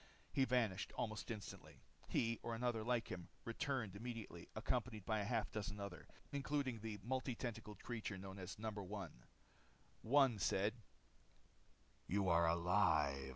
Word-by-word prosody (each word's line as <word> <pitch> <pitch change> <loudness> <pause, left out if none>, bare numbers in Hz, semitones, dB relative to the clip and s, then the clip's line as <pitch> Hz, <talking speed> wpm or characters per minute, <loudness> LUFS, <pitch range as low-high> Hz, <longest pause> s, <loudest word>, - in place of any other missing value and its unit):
He 135 - +5
vanished 115 -7 +2
almost 110 -3 -2
instantly. 105 -7 -6 0.2
He, 115 -1 +2
or 115 - -2
another 120 -1 +1
like 120 0 +1
him, 90 -1 -4 0.2
returned 115 -3 -1
immediately 110 -6 -5
accompanied 110 -2 0
by 110 0 +2
a - - +1
half 115 -1 +1
dozen 105 -1 -3
others, 100 0 -5 0.2
including 140 -4 0
the 110 -1 -3
multi 130 +1 0
tentacled 110 -4 -5
creature 110 -4 -3
known 95 +1 -7
as 95 0 -5
No. 110 +1 -2
1. 100 -4 -4 0.9
One 130 -2 +5
said, 100 +3 +3 1.3
"You 100 +1 +2
are 85 0 +6
alive." 80 -6 +3
110 Hz, 140 wpm, -42 LUFS, 95-120 Hz, 1.3 s, are